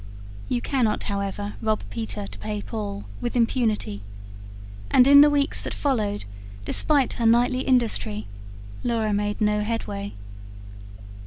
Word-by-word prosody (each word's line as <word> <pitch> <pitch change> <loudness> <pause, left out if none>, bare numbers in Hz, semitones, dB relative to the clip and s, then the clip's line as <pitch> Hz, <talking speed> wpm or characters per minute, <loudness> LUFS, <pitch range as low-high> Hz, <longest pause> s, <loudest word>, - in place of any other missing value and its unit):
You 245 -1 0
cannot 245 -6 0
however 200 0 -3
rob 215 -1 0
Peter 105 -2 -4
to 100 +1 -10
pay 105 0 -4
Paul, 100 0 -5 0.2
with 240 - -3
impunity, 225 - 0 0.9
and 250 - +6
in 280 +1 +9
the 295 - +7
weeks 285 -1 +1
that - - -5
followed, 215 - -1 0.4
despite 285 - +3
her 235 - -2
nightly 245 +3 +3
industry, 230 - +1 0.6
Laura 225 -3 0
made 205 0 -1
no 210 -1 +2
headway. 105 - -3
215 Hz, 130 wpm, -24 LUFS, -, 0.9 s, in